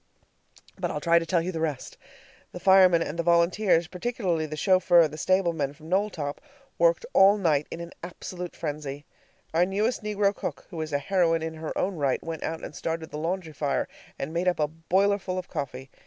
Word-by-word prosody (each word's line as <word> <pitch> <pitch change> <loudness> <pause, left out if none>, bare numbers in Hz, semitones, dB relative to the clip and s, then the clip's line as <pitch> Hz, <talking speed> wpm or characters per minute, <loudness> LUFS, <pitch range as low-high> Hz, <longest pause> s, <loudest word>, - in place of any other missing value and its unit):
But - - -1
I'll 150 - -3
try 170 +2 +4
to 165 - -6
tell 170 -2 +2
you 185 - -2
the 165 - -4
rest. 150 -5 -3 0.6
The 180 - -6
firemen 185 -3 +6
and 165 +2 -6
the - - +4
volunteers 170 +1 +3
particularly 180 -4 -2
the 155 0 -6
chauffeur 185 +1 +5
and 155 -2 +1
stablemen 165 -4 0
from 155 +2 -13
Knowltop 180 -7 -1 0.4
worked - - +3
all 195 +2 +6
night 155 -7 +1
in - - -6
an 170 0 -8
absolute 180 0 -7
frenzy. 145 -2 -5 0.5
Our 165 +2 +4
newest 205 +7 0
negro 205 -1 +1
cook, - - -5
who 165 -3 -4
is 155 -1 -4
a 145 - +2
heroine 165 +1 +1
in 160 0 -3
her 160 0 -5
own 185 -1 -1
right, 140 -3 0
went 165 -1 -5
out 160 0 -4
and - - -7
started 165 -1 -4
the 150 - -5
laundry 165 0 -3
fire 145 -1 -1 0.3
and 150 +4 -5
made 175 +2 -1
up 180 - +2
a 150 - +2
boilerful 185 +4 0
of 185 - -4
coffee. 135 -4 -5
170 Hz, 200 wpm, -27 LUFS, 155-185 Hz, 0.6 s, firemen